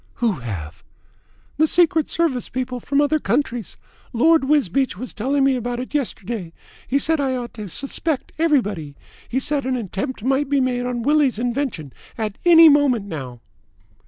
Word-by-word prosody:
"Who 235 -3 +1
have?" 85 -9 -7 0.8
"The 315 +1 +4
Secret 325 -2 +2
Service 310 -8 -1
people 255 0 -3
from 280 +4 +1
other 305 +1 +2
countries. 240 - -2 0.4
Lord 315 +4 +4
Wisbeach 270 - +1
was 255 +4 -7
telling 270 +5 0
me 270 -1 +3
about 245 0 -3
it 255 - -7
yesterday. 220 - -3 0.3
He 275 - +1
said 320 +3 +2
that - - +1
I 260 - -1
ought 240 -2 -5
to 210 -3 -7
suspect 280 - -3
everybody. 205 - 0 0.3
He 250 - -2
said 285 +2 +1
that 260 - -4
an 260 - 0
attempt 225 +2 -4
might 270 +2 +1
be 285 -1 +2
made 250 -1 0
on 240 -2 -3
Willie's 290 -3 +2
invention 240 - -3 0.2
at 215 -3 -4
any 330 -1 +9
moment 285 -8 +4
now." 130 -10 -7
255 Hz, 170 wpm, -21 LUFS, 215-285 Hz, 0.8 s, any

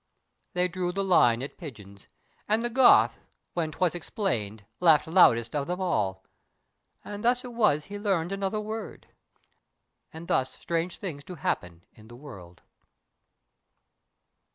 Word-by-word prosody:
They 180 0 +2
drew 180 0 -3
the 195 +2 -2
line 125 -11 +4
at 140 - -8
pigeons; 105 - -11 0.4
and 220 +3 +1
the 240 - -1
Goth 255 +1 +5 0.3
When 165 -3 -2
'twas 180 +1 0
explained 115 - -3
laughed 160 -4 +5
loudest 120 -9 +4
of 140 -1 -1
them 180 +1 -3
all; 95 - -1 0.8
And 205 0 -7
thus 245 +2 +2
it 245 - -8
was 210 -11 +2
he 205 0 -7
learned 190 -4 0
another 195 +2 -2
word. 215 +1 -6 1.1
And 160 +2 -10
thus 130 -7 0
strange 170 +1 -2
things 155 -8 -6
do 180 - -9
happen 85 - -3
in 110 0 -17
the 120 - -12
world. 95 - -13
170 Hz, 140 wpm, -27 LUFS, 120-195 Hz, 1.1 s, Goth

